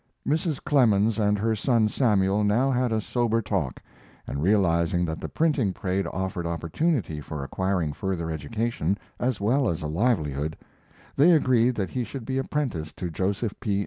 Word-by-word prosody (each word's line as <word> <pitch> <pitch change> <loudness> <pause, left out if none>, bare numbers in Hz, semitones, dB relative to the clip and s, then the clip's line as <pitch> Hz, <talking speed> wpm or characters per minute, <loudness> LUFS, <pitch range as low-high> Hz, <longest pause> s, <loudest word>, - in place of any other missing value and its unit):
Mrs. 155 -1 0
Clemens 115 -6 +3
and 105 -1 +2
her 110 +2 +1
son 115 0 +2
Samuel 105 -4 +2
now 115 +7 +2
had 125 -1 +1
a 110 - +1
sober 115 +1 0
talk, 95 - -2 0.5
and, 70 - -4
realizing 90 -2 +2
that 80 -1 -4
the - - -5
printing 145 - +1
trade 95 +1 -2
offered 90 -2 -3
opportunity 85 - -1
for 75 0 -6
acquiring 90 0 -1
further 85 -2 -3
education 95 +4 -2 0.2
as 125 -3 0
well 120 +5 +2
as 80 -2 -3
a - - -2
livelihood, 80 - 0 0.6
they 170 +6 +6
agreed 125 -5 +3
that 100 -3 -2
he 125 - -1
should 120 +1 -7
be 130 +2 -1
apprenticed 120 - -3
to 90 -2 -4
Joseph 100 +6 -1
P. 105 -5 0
105 Hz, 165 wpm, -26 LUFS, 85-120 Hz, 0.6 s, they